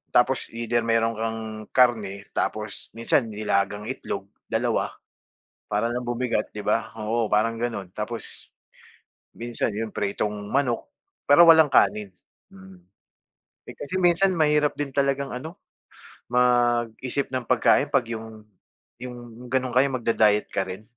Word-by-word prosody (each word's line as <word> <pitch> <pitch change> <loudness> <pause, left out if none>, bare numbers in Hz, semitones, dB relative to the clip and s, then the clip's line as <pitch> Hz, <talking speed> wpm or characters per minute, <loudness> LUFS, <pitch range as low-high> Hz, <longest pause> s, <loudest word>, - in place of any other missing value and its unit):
Tapos, 130 +2 +3
either 120 0 0
meron 115 0 +2
kang 115 0 -2 0.3
karne 105 -6 +2
tapos 105 -2 -3
minsan 115 +1 +2
nilagang 105 -1 -1
itlog, 100 -6 -5 0.2
2 - - 0 0.7
para 105 +3 0
lang 125 0 -3
bumigat 120 -2 -1
di 105 - -5
ba? 110 +2 0
Oo 110 +1 -1
parang 115 +2 +1
ganun 100 -7 -3
tapos, 110 +3 -6 0.9
minsan 120 -1 -2
yun 110 0 -3
pritong 105 +1 -2 0.2
manok, 125 -1 0 0.4
pero 145 +4 +8
walang 160 -2 +8
kanin, 105 -5 +3 0.4
mm. 95 -1 -14 0.9
Eh, - - -9
kasi 185 +6 -3
minsan 180 +2 +4
mahirap 150 -3 +2
din 145 - -1
talagang 140 0 +1
ano, 155 +8 -7 0.7
mag-isip 120 +1 +1
ng 130 -2 -3
pagkain 130 +3 +3
'pag 135 -3 +2
yung 110 -1 -7 0.6
yung 120 -1 -9
ganun 130 -1 0
kayo, 130 +2 +5
mag-da-diet 110 -3 +2
ka 95 -1 -1
rin, 95 +3 -7
115 Hz, 130 wpm, -25 LUFS, 105-130 Hz, 0.9 s, pero